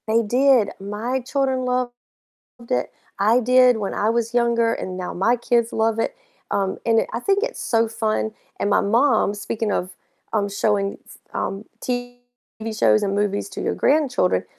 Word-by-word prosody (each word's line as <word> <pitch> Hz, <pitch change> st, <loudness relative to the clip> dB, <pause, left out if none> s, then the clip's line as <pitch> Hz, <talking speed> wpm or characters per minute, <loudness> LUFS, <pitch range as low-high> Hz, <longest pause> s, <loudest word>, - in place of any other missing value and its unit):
They 225 Hz, +1 st, +3 dB
did, 245 Hz, -1 st, +3 dB
my 215 Hz, +6 st, -3 dB
children 260 Hz, 0 st, -1 dB
loved 250 Hz, -1 st, 0 dB, 0.8 s
it. 125 Hz, -, 0 dB, 0.3 s
I 220 Hz, +5 st, +4 dB
did 250 Hz, 0 st, +5 dB
when 200 Hz, -2 st, -3 dB
I 210 Hz, +2 st, +1 dB
was 230 Hz, 0 st, -1 dB
younger, 235 Hz, -1 st, +2 dB
and 185 Hz, -1 st, -5 dB
now 180 Hz, -1 st, -5 dB
my 230 Hz, +7 st, +2 dB
kids 235 Hz, -1 st, +1 dB
love 225 Hz, 0 st, +1 dB
it. -, -, -1 dB, 0.4 s
Um, 195 Hz, -1 st, -1 dB
and 225 Hz, -1 st, +4 dB
it -, -, -3 dB
I 230 Hz, -, -2 dB
think 395 Hz, +9 st, +1 dB
it's -, -, -3 dB
so 230 Hz, -1 st, +1 dB
fun. 220 Hz, -1 st, -1 dB, 0.3 s
And 205 Hz, -, 0 dB
my -, -, +4 dB
mom, 225 Hz, 0 st, +2 dB
speaking 210 Hz, +1 st, -3 dB
of, 180 Hz, -1 st, -1 dB, 0.4 s
um, 205 Hz, -2 st, +1 dB
showing, 200 Hz, 0 st, 0 dB
s -, -, -15 dB, 0.2 s
um, 195 Hz, +2 st, -3 dB, 0.2 s
TV 245 Hz, 0 st, -4 dB, 0.6 s
shows 215 Hz, -, +4 dB
and 200 Hz, -1 st, 0 dB
movies 205 Hz, 0 st, -1 dB
to -, -, -6 dB
your -, -, -1 dB
grandchildren, 270 Hz, -, +2 dB
225 Hz, 175 wpm, -22 LUFS, 205-245 Hz, 0.8 s, did